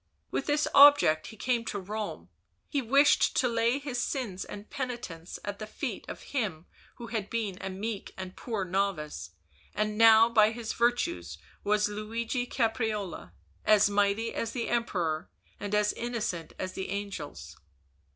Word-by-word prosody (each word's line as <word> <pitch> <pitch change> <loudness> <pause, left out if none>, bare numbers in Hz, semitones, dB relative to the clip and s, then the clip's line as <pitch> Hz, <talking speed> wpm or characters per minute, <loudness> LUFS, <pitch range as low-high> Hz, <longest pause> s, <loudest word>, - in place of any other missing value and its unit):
With - - -2
this 295 0 +2
object 280 - +7
he 220 - -11
came 240 +1 0
to 205 - -3
Rome; 210 +2 -5 0.4
he 285 - -1
wished 275 +4 +4
to 255 - +3
lay 230 +2 +2
his 275 -4 -3
sins 220 -9 -3
and 205 +1 -9
penitence 240 - -5
at 205 -1 -4
the 215 - -5
feet 215 - -5
of - - -7
him 190 - -2 0.3
who 235 -2 -9
had 210 -3 -2
been 210 -5 -2
a 190 - -3
meek 200 +2 -4
and 185 -1 -7
poor 220 -6 -3
novice, 175 - -2 0.5
and 215 +1 -1
now 225 0 +8
by 220 -2 +5
his 230 -1 -4
virtues 245 +8 0 0.3
was 210 0 +2
Luigi 225 +4 -3
Oaprarola, 220 -5 -2 0.3
as 210 -1 +5
mighty 205 +3 +1
as 230 0 -3
the 240 -3 -2
Emperor 180 -9 -1 0.3
and 205 0 -2
as 210 0 +2
innocent 230 -9 -3
as 185 0 -4
the 190 - -5
angels. 155 - -5
215 Hz, 155 wpm, -29 LUFS, 195-235 Hz, 0.5 s, now